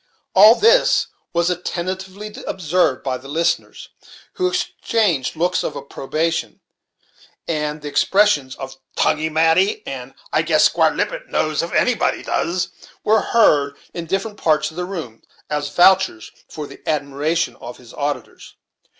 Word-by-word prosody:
All 220 +2 +8
this 465 - +4 0.3
was 170 +1 +1
attentively 185 +4 -5
observed 175 -6 0
by 130 -2 -2
the 135 - -13
listeners, 165 +4 -2 0.4
who 365 - 0
exchanged 205 - 0
looks 175 +3 +1
of 150 - -3
approbation; 160 +4 -3 0.9
and 150 -1 -2
the - - -5
expressions 150 -7 +2
of 135 -1 -8 0.2
"tonguey 155 +1 +1
mati," 165 - +2
and - - -7 0.2
"I - - +3
guess - - +3
Squire - - +3
Lippet - - -3
knows 155 -1 0
if 170 - -5
anybody 250 -2 +1
does," 180 +2 -1 0.3
were 220 +1 +3
heard 145 -11 +3 0.2
in 170 -1 -6
different 200 +4 -2
parts 150 -3 +1
of - - -16
the 180 +1 -3
room, 160 - -7 0.3
as 145 -1 -1
vouchers 180 - +3 0.2
for 150 - -6
the - - -12
admiration 150 +3 -1
of 120 +1 -9
his 120 -2 -15
auditors. 145 0 -5
165 Hz, 140 wpm, -20 LUFS, 145-190 Hz, 0.9 s, All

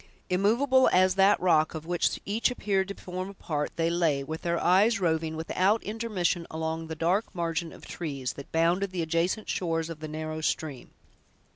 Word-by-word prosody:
Immovable 240 +8 +4
as 185 0 +4
that 195 +2 +4
rock, 160 -3 +3
of 160 0 -6
which 175 0 0
each 215 +5 +1
appeared 195 -5 0
to 200 - -6
form 185 +1 -6
a 200 - -11
part, 150 -5 -2
they 165 0 +1
lay, 160 -5 +1
with 160 +3 -6
their 170 -1 0
eyes 205 +6 +4
roving, 160 -3 0
without 185 +6 +1
intermission, 205 -6 -1
along 160 0 -3
the 160 - -5
dark 175 +7 +1
margin 165 -1 -2
of - - -13
trees, 140 -6 -4
that 140 - -11
bounded 170 +4 +2
the 180 -2 -2
adjacent 170 +6 0
shores 165 -2 -1
of 160 - -8
the 155 - -6
narrow 155 +1 -5
stream. 150 -4 -2
170 Hz, 180 wpm, -28 LUFS, 160-195 Hz, -, Immovable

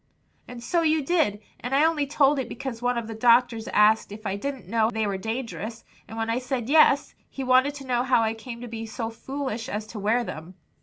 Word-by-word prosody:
"And 245 -1 -9
so 340 +6 +1
you 315 -2 +2
did, 275 - +1 0.2
and 250 +3 -2
I 290 +3 +5
only 310 -3 +1
told 285 0 +3
it 250 -3 -3
because 240 -2 -6
one 245 0 0
of 235 - -2
the 225 - -5
doctors 235 0 +3
asked 210 0 +3
if 215 +1 -10
I 195 -1 -1
didn't 265 -2 -5
know 220 +2 +2
they 220 -2 -1
were 200 -1 -1
dangerous; 220 0 -5 0.2
and 225 - -9
when 225 0 -1
I 230 +2 0
said 250 -2 -3
yes, 290 -2 +5 0.2
he 270 - -6
wanted 260 +3 +3
to 275 -1 -9
know 245 -2 +1
how 250 -2 +3
I 220 0 0
came 235 +1 -9
to 245 - -6
be 225 -1 -6
so 225 +1 -4
foolish 260 -1 -5
as 210 +1 -3
to 215 - -5
wear 220 +4 +1
them." 170 -3 -8
235 Hz, 235 wpm, -25 LUFS, 220-265 Hz, 0.2 s, I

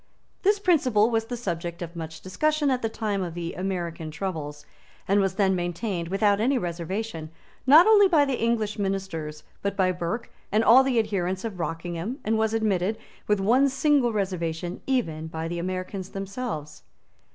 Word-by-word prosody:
This 410 +1 +3
principle 255 - +3
was 225 -1 +1
the 245 +1 -5
subject 170 -6 -4
of 170 0 -8
much 160 -1 -7
discussion 300 +9 +1
at 255 -1 0
the 225 - -1
time 215 -3 -2
of 175 -2 -4
the 170 -1 -4
American 175 -4 -3
troubles, 155 -3 -5 0.4
and 200 +1 +3
was 195 -2 +1
then 190 -2 +2
maintained, 175 0 -2
without 200 +2 +2
any 260 +4 +2
reservation, 175 -2 -4 0.4
not 305 +6 +9
only 420 -2 +7
by 315 -6 +4
the 270 -4 -2
English 225 -2 0
Ministers, 190 -6 -3 0.2
but 200 0 -2
by 185 -2 +3
Burke 180 +6 -4 0.2
and 215 +2 +3
all 245 +4 +8
the 265 -2 +1
adherents 190 -3 0
of 205 -5 -5
Rockingham, 170 +7 -3
and 220 +1 +1
was 220 0 +1
admitted, 210 -1 +1 0.3
with 210 -1 +2
one 250 +8 +4
single 270 -2 +2
reservation, 175 -4 -3
even 165 -13 -1
by 160 0 -4
the 170 +1 -3
Americans 185 +1 -4
themselves. 195 -6 -5
195 Hz, 170 wpm, -26 LUFS, 175-230 Hz, 0.4 s, not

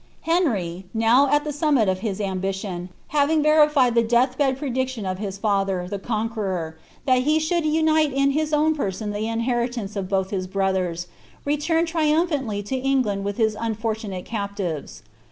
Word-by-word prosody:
Henry, 205 - 0
now 235 +5 +4
at 295 +1 +3
the 300 - -4
summit 290 -7 +2
of 185 0 0
his 200 -1 -3
ambition, 190 -2 -3 0.2
baring 300 +1 +3
verified 300 -5 +4
the 235 - +4
death 240 +3 +2
bed 270 -2 +1
prediction 260 -5 -2
of 185 0 -3
his 200 -2 -4
father, 195 -3 0
the 200 +1 -4
Conqueror, 205 -7 -3 0.3
that 255 -2 +4
he 305 +4 +2
should 315 +1 0
unite 315 -1 +3
in 275 +1 +2
lii^ 310 +1 0
own 310 +1 +3
person 210 -6 -3
the 210 +2 -2
inheritance 230 -2 -2
of 190 -2 -3
both 190 -1 0
his 185 -2 -2
brothers, 185 -3 -1 0.4
returned 325 +3 +1
Iriumphanilf 300 - 0
lo 265 - +1
England 255 -7 0
witli 200 0 -2
his 220 -1 +1
unfortunate 220 -4 -3
captives. 200 - -4
230 Hz, 160 wpm, -23 LUFS, 195-290 Hz, 0.4 s, now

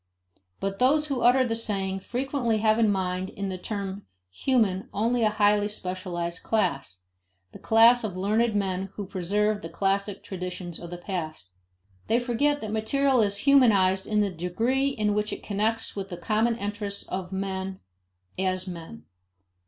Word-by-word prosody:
But 195 0 -3
those 295 +4 +4
who 270 -3 -1
utter 255 +2 +5
the 225 - -1
saying 195 -4 -1
frequently 245 +1 -1
have 215 +1 +3
in 220 -2 +4
mind 185 -1 -1
in 200 -1 -4
the 185 - -4
term 200 -1 -5 0.2
human 200 - +1
only 235 +3 +1
a 215 - +4
highly 205 -1 +3
specialized 180 -3 -3
class: 135 - -1 0.5
the - - -12
class 230 +2 +5
of 195 -4 -4
learned 215 +4 +1
men 190 -1 -1
who 205 - -4
preserve 205 +3 0
the 165 - -7
classic 195 +3 -1
traditions 180 -2 -5
of 170 - -8
the 175 - -6
past. 160 - -5 0.6
They 230 - +3
forget 275 +5 +1
that 215 - -4
material 260 +4 +2
is 200 -1 +1
humanized 200 -9 +4
in 210 -1 +2
the 200 -2 0
degree 225 +11 0
in 215 -6 0
which 210 0 -1
it - - -6
connects 220 +2 -1
with 195 -1 -5
the 175 - -6
common 220 +5 +1
interests 205 -1 -4
of 185 -1 -5
men 190 0 -3 0.6
as 185 -1 0
men. 165 - -8
205 Hz, 160 wpm, -26 LUFS, 185-225 Hz, 0.6 s, utter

